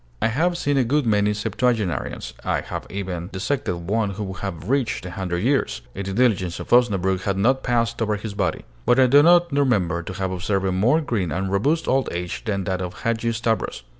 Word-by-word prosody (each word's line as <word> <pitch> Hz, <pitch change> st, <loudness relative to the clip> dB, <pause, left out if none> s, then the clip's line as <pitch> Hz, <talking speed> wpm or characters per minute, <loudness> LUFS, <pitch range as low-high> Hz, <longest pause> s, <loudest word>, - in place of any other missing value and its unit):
I -, -, +2 dB
have 170 Hz, +9 st, +1 dB
seen 145 Hz, -4 st, 0 dB
a 135 Hz, -, +4 dB
good 140 Hz, +4 st, +1 dB
many 105 Hz, -2 st, +2 dB
septuagenarians; 105 Hz, -2 st, -1 dB
I -, -, 0 dB
have -, -, -6 dB
even 90 Hz, -3 st, -4 dB
dissected 95 Hz, -5 st, -2 dB
one 110 Hz, +1 st, +1 dB
who 100 Hz, +2 st, -5 dB
would 95 Hz, -2 st, -6 dB
have 90 Hz, -3 st, -5 dB
reached 130 Hz, -6 st, 0 dB
a 90 Hz, -, -6 dB
hundred 90 Hz, -1 st, -3 dB
years, 130 Hz, -, +1 dB
if 100 Hz, 0 st, -5 dB
the 95 Hz, -, -3 dB
diligence 95 Hz, -7 st, +1 dB
of -, -, -8 dB
Osnabrück 95 Hz, -6 st, +3 dB
had 95 Hz, 0 st, -1 dB
not 130 Hz, +7 st, +2 dB
passed 115 Hz, -2 st, 0 dB
over 105 Hz, -1 st, +1 dB
his 105 Hz, 0 st, -6 dB
body: 95 Hz, -5 st, -2 dB, 0.2 s
but 125 Hz, +2 st, +5 dB
I 130 Hz, -, +7 dB
do 140 Hz, +3 st, +6 dB
not 175 Hz, +1 st, +5 dB
remember 105 Hz, -, +1 dB
to 90 Hz, -, -7 dB
have 95 Hz, -1 st, -2 dB
observed 95 Hz, +1 st, -1 dB
a 95 Hz, -, +1 dB
more 115 Hz, -, +3 dB
green 105 Hz, -, -2 dB
and 95 Hz, +3 st, -2 dB
robust 145 Hz, +12 st, +1 dB
old 135 Hz, 0 st, +1 dB
age 90 Hz, 0 st, -4 dB
than 100 Hz, -3 st, -1 dB
that 95 Hz, 0 st, -2 dB
of 90 Hz, -1 st, -6 dB
Hadgi 115 Hz, 0 st, 0 dB
Stavros. 115 Hz, -, -2 dB
105 Hz, 215 wpm, -23 LUFS, 95-125 Hz, 0.2 s, I